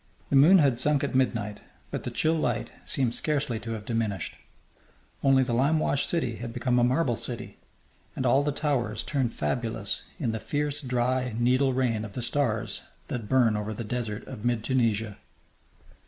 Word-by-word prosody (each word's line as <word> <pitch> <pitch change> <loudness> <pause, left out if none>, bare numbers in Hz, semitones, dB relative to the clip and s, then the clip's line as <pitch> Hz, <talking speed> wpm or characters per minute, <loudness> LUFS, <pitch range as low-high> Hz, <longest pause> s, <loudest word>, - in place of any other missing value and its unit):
The - - +3
moon 155 +8 +8
had 140 -7 +3
sunk 145 +1 +2
at 140 - -1
midnight, 105 -5 0 0.3
but - - -3
the - - -1
chill 160 - +1
light 125 -8 -1
seemed 125 -4 +1
scarcely 145 -7 -1
to 115 +1 -5
have 105 -2 -6
diminished; 110 -6 -2 0.9
only 135 -1 +5
the 125 -2 -2
limewashed 140 +2 +2
city 125 -10 -1
had 115 0 -6
become 125 0 +1
a - - +3
marble 125 0 +2
city, 115 -2 -6 0.6
and 130 - -2
all 130 +3 +4
the 145 +1 0
towers 125 -7 -1
turned 130 -5 0
fabulous 115 -2 -2
in 115 - 0
the 110 - -3
fierce, 145 +3 -2
dry, 125 -2 0
needle 130 +3 +3
rain 120 -4 0
of 105 -3 -7
the 125 - -3
stars 120 -4 +1 0.3
that 115 -4 -4
burn 125 -5 +4
over 105 +1 -3
the 115 - -4
desert 110 -2 -4
of 120 -5 -8
mid 120 -2 0
Tunisia. 115 -5 0
125 Hz, 175 wpm, -27 LUFS, 115-135 Hz, 0.9 s, moon